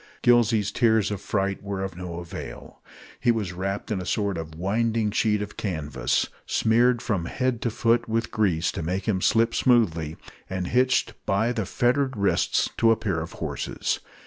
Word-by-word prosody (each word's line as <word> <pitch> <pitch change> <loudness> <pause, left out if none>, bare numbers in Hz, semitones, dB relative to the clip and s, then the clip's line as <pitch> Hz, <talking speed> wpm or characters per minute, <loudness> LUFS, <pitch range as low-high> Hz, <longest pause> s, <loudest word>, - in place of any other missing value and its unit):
Gillsey's 115 -4 +4
tears 110 -4 +2
of 100 -1 -4
fright 100 -1 -1
were 100 -1 -4
of 95 -2 -5
no 90 -1 -6
avail. 85 -8 -8 0.4
He - - +1
was 105 -6 -2
wrapped 95 +4 -3
in 95 -3 -1
a - - -4
sort 100 -2 0
of 80 -1 -6
winding 110 +4 0
sheet 105 -1 +1
of 105 - -9
canvas, 80 -7 -1 0.2
smeared 120 +2 +3
from 100 -8 -1
head 125 +3 -1
to 120 - 0
foot 115 +1 +1
with 115 +1 -1
grease 95 -8 +1
to - - -5
make 90 +4 -3
him 95 -4 +1
slip 115 +3 +3
smoothly, 85 -11 +2 0.3
and 95 -1 -2
hitched 130 +1 +2
by 110 +5 +2
the 110 -6 -2
fettered 130 +1 +1
wrists 100 -1 +2
to 115 - +4
a 115 - +6
pair 100 -7 -1
of 80 - -7
horses. - - -3
105 Hz, 175 wpm, -25 LUFS, 95-115 Hz, 0.4 s, a